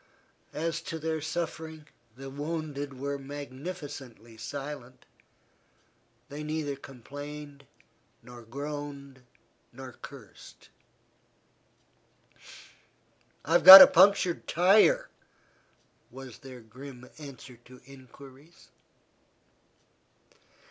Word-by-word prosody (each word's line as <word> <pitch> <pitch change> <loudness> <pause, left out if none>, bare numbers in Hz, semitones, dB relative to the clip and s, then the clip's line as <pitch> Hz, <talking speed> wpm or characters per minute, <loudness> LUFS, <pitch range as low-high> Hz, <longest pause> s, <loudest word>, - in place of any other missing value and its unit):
As 165 +1 -3
to 165 0 -7
their 160 0 -4
suffering, 160 -1 -6 0.3
the 135 0 -9
wounded 145 -2 -6
were 140 +1 -4
magnificently 140 - -9
silent, 130 +1 -9 1.2
they 145 +2 -9
neither 150 -2 -4
complained 145 +2 -11 0.6
nor 125 -1 -13
groaned 140 +2 -8 0.5
nor 130 +1 -11
cursed. 130 -3 -15 2.8
"I've 165 +3 +2
got 190 +1 +14
a - - +10
punctured 185 -1 +3
tire," 215 - +3 1.0
was 130 -3 -12
their 130 -2 -12
grim 125 +3 -13
answer 135 -4 -12
to 130 0 -16
inquiries. 135 +3 -17
140 Hz, 80 wpm, -28 LUFS, 130-155 Hz, 2.8 s, got